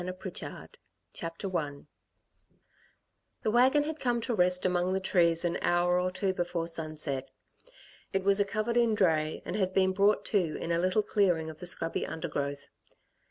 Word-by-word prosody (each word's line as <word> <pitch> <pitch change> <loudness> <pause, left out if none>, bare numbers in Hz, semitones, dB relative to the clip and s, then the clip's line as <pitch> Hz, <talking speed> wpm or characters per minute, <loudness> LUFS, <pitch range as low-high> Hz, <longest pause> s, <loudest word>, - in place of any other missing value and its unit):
PRICHARD - - -7 0.3
CHAPTER 170 +3 -5
I 145 -4 -2 1.6
The 215 - +1
wagon 260 +5 +4
had 310 +1 -4
come 240 -2 +1
to 240 +1 -2
rest 180 -2 +2
among 180 0 +1
the 190 - +1
trees 170 -3 +2
an 175 0 0
hour 175 +1 +2
or 180 0 0
two 190 +1 -1
before 175 -2 -2
sunset. 155 -4 -4 0.8
It 195 -1 0
was 200 +1 +4
a - - +5
covered 215 +4 -1
in 235 -2 +3
dray, 160 -6 +1
and - - -4
had 190 -2 -1
been 190 -1 +3
brought 200 +2 +3
to 175 -7 +2
in 170 - -4
a 170 - +2
little 185 +4 +2
clearing 175 -8 +1
of 155 - -15
the 180 - -7
scrubby 165 - -1
undergrowth. 140 -3 -4
180 Hz, 165 wpm, -30 LUFS, 165-200 Hz, 1.6 s, a